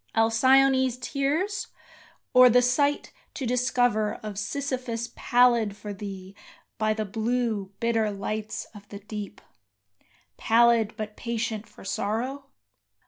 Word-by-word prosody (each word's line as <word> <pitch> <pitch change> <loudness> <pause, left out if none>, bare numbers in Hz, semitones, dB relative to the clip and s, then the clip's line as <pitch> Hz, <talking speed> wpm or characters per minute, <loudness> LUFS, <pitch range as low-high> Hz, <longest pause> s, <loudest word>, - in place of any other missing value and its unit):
Alcyone's 260 +3 +4
tears, 300 +10 -1 0.7
or 250 0 +8
the 250 +1 +4
sight 285 +4 +1 0.2
to 270 - -4
discover 245 -3 +1
Of 210 -2 -5
Sisyphus 250 -1 -3
pallid 235 -4 +3
for 205 0 -7
thee 195 -2 -8 0.5
by 215 0 +1
the 215 0 -2
blue, 220 -1 -2
bitter 225 -2 +1
lights 215 +2 -4
of 205 -1 -14
the 200 - -8
deep 210 0 -8 1.0
Pallid, 230 -1 +3
but 215 -1 -5
patient 225 -2 -3
for - - -15
sorrow? 235 +8 -3
230 Hz, 115 wpm, -26 LUFS, 210-250 Hz, 1.0 s, or